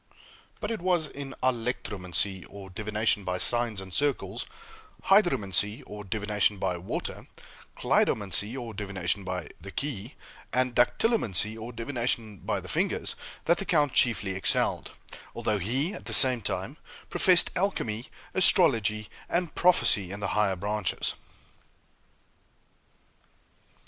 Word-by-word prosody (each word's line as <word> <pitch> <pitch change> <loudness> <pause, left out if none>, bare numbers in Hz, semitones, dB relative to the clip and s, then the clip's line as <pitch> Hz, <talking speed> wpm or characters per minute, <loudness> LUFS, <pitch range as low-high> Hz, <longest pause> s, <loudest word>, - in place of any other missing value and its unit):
But 210 - -3
it 225 - -3
was 175 -3 +2
in 140 -2 -8
alectromancy, 100 -7 -1
or 100 -2 -11
divination 105 +1 -1
by 90 -1 -2
signs 120 0 +3
and 95 -1 -9
circles; 145 +2 -1 0.6
hydromancy, 110 - +3
or 105 0 -8
divination 105 0 0
by 90 -2 -2
water; 90 - -5 0.5
cleidomancy, 105 +3 +1
or 115 -2 -7
divination 100 -1 -3
by 90 -4 -4
the - - -10
key, 135 -3 -5 0.4
and 125 +1 +1
dactylomancy, 120 - +2
or 115 +2 -7
divination 115 -3 -2
by - - -2
the - - -10
fingers, - - 0 0.3
that 170 +1 +3
the - - -1
count 150 -6 +2
chiefly 110 -6 +3
excelled, 95 0 +1 0.5
although 105 -1 0
he, 130 - -1
at - - -9
the - - 0
same 130 -3 +6
time, - - -4 0.3
professed 180 -2 +5
alchemy, 130 - -2 0.3
astrology, 115 - +4 0.2
and 175 -2 -1
prophecy 105 - +3
in 100 +2 -6
the 100 - -2
higher 105 -3 +1
branches. 100 0 -2
110 Hz, 125 wpm, -28 LUFS, 100-135 Hz, 0.6 s, same